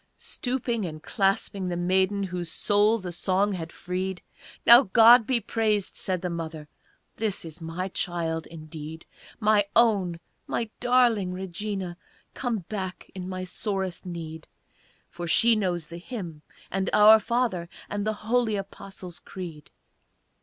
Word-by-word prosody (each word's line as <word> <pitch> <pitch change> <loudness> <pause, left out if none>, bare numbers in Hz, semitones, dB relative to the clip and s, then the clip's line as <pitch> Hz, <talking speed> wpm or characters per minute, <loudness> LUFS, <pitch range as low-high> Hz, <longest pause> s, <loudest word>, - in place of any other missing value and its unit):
Stooping 245 -3 -2
and 155 -3 -6
clasping 195 -1 0
the 175 - -2
maiden 190 +3 +1
Whose 180 -3 -4
soul 210 +2 +3
the 185 -5 -6
song 190 +4 +1
had 165 -3 -5
freed, 185 +1 -4 0.4
"Now 235 +2 +10
God 230 +1 +8
be 255 -2 +2
praised!" 215 -2 0
said 185 -2 -2
the 180 - -1
mother, 160 -2 -5 0.5
"This 210 -5 -1
is 165 +2 -10
my 165 +3 -4
child 170 -3 -2
indeed! 155 0 -9 0.3
My 210 -2 +4
own, 200 -8 +3 0.3
my 230 -2 -2
darling 240 -7 +3
Regina, 190 0 -4 0.4
Come 230 -8 -3
back 190 -3 -5
in 185 -1 -6
my 185 0 -4
sorest 190 -1 -3
need, 165 -3 -7 0.6
For 175 0 -7
she 230 +7 +5
knows 180 -6 -1
the 170 +2 -9
Hymn, 175 -7 -7 0.3
and 195 0 0
'Our 215 +1 +8
Father,' 220 -6 -1 0.2
And 205 0 -3
the 215 - +1
holy 230 -1 +2
'Apostles' 195 -2 -7
Creed'!" 170 -6 -9
190 Hz, 140 wpm, -26 LUFS, 175-215 Hz, 0.6 s, Now